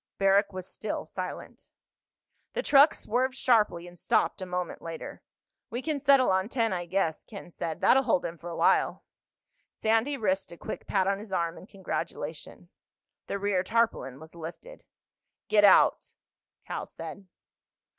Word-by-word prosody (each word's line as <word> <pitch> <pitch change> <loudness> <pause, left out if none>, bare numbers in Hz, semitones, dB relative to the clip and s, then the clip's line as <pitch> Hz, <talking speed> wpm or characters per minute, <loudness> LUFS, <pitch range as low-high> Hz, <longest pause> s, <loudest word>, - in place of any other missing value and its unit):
Barrack 195 +1 +3
was 185 -1 -7
still - - -5
silent. - - -7 0.8
The - - -2
truck 285 +2 +6
swerved 255 +3 -1
sharply 210 -9 +2
and 175 -1 -14
stopped 165 - +1
a 185 - -4
moment 180 -1 -4
later. 165 -1 -7 0.5
"We 245 +3 -4
can 310 -3 -1
settle 275 -4 +5
on 190 +2 +1
ten, 230 -5 0
I 175 -1 -3
guess," 175 -3 0
Ken 200 -4 -11
said. 160 -1 -5
"That'll 265 - +5
hold 230 -8 +1
him 165 0 -5
for 175 - -8
a 170 - -5
while." - - +2 0.7
Sandy 225 +6 +1
risked 195 -4 -1
a 170 - -10
quick - - -7
pat 190 -2 +2
on 195 +1 0
his 210 -1 -10
arm 170 -2 -1
in 185 - -12
congratulation. 195 -3 -6 0.6
The - - -2
rear 200 -2 +1
tarpaulin 205 - 0
was 160 +1 -12
lifted. 170 - -10 0.6
"Get 210 -1 +4
out," 200 - +5 0.5
Cal - - -5
said. 195 -1 -9
195 Hz, 155 wpm, -28 LUFS, 175-230 Hz, 0.8 s, truck